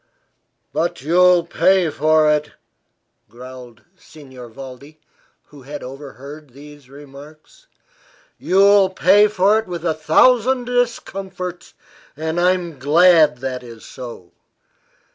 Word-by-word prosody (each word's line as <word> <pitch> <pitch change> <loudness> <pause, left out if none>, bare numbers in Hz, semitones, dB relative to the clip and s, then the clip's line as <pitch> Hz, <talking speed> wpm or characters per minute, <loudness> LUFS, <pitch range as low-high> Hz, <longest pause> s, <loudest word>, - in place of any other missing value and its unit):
"But 165 -5 -3
you'll 175 +2 +3
pay 180 -1 +1
for 155 +1 +2
it!" 150 0 0 0.8
growled 125 -1 -13
Signor 130 -8 -14
Valdi, 135 +5 -12 0.5
who 145 -2 -15
had 145 +3 -9
overheard 140 +2 -11
these 145 +1 -16
remarks. 145 - -16 0.7
"You 185 - -3
will 200 0 +5
pay 195 +2 +4
for 210 +1 +2
it 220 - -8
with 175 -2 -7
a 165 - +1
thousand 245 - +2
discomforts 195 -7 -4 0.4
and 160 +2 -3
I'm 175 -4 -1
glad 155 0 +4
that 130 -1 -5
is 115 -2 -13
so. 120 -9 -11
155 Hz, 110 wpm, -19 LUFS, 135-180 Hz, 0.8 s, will